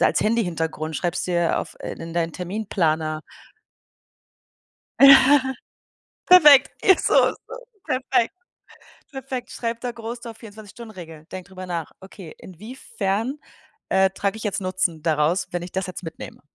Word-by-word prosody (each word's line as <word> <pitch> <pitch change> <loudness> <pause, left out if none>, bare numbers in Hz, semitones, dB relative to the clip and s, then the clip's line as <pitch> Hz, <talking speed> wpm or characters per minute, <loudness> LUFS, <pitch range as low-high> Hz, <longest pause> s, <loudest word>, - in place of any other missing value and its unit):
als - - +2
Handy-Hintergrund, 165 -8 -1
schreibst 175 +2 -2
dir 175 -2 +1
auf - - -9
äh, - - -5
in 165 0 -9
deinen 165 -1 -1
Terminplaner. 165 -5 -2 1.8
Ja. 270 0 +7 0.7
Perfekt. 295 -7 +8
Ja, 380 - +7
so - - 0 0.2
ist - - -12
das - - -8 0.4
perfekt. 250 -3 +1 0.8
Perfekt. 265 -2 -6
Schreib 230 -1 -4
da 245 - -3
groß 235 +1 -7
drauf: 230 -2 -9
„24- 215 -2 -12
Stunden-Regel.“ 175 -9 -11
Denk 185 -1 -7
drüber 185 -1 -9
nach. 170 -3 -4
Okay. 190 -3 -12
Inwiefern, 225 - -4 0.5
äh, 190 0 +3
trage 200 +1 -2
ich 220 - -8
jetzt 205 -1 -2
Nutzen 185 -4 -2
daraus, 160 +3 +1
wenn 175 0 -3
ich 175 - -9
das 190 0 -2
jetzt 185 - -8
mitnehme? 165 -2 -9
190 Hz, 140 wpm, -22 LUFS, 170-235 Hz, 1.8 s, Perfekt